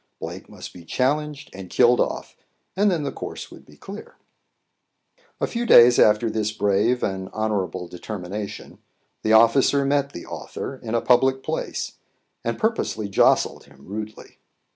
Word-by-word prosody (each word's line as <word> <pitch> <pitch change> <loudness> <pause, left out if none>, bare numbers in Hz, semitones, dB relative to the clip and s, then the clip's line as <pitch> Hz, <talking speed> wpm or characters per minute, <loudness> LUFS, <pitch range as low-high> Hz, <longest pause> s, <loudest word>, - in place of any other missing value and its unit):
Blake - - -7
must - - -10
be 90 - -12
challenged 150 - -1
and 95 -1 -9
killed 125 +3 +4
off, - - -2 0.4
and 205 +2 +3
then 170 -5 0
the 140 - -2
course - - -7
would - - -14
be - - -18
clear. - - -10 1.2
A - - +1
few 235 0 -3
days 120 - +7
after 105 +2 +4
this 110 -1 -1
brave 105 +4 +1
and 95 -1 -3
honourable 95 -5 -2
determination, 100 +2 -7 0.4
the 110 - +1
officer 130 +5 +5
met 140 0 +1
the 85 - -9
author 135 - -7
in 115 -2 -4
a 115 - +2
public 130 +1 +3
place, - - -4 0.4
and 115 - -2
purposely 215 - -1
jostled 100 - +2
him 70 -1 -19
rudely. 105 +2 -8
110 Hz, 150 wpm, -23 LUFS, 100-135 Hz, 1.2 s, days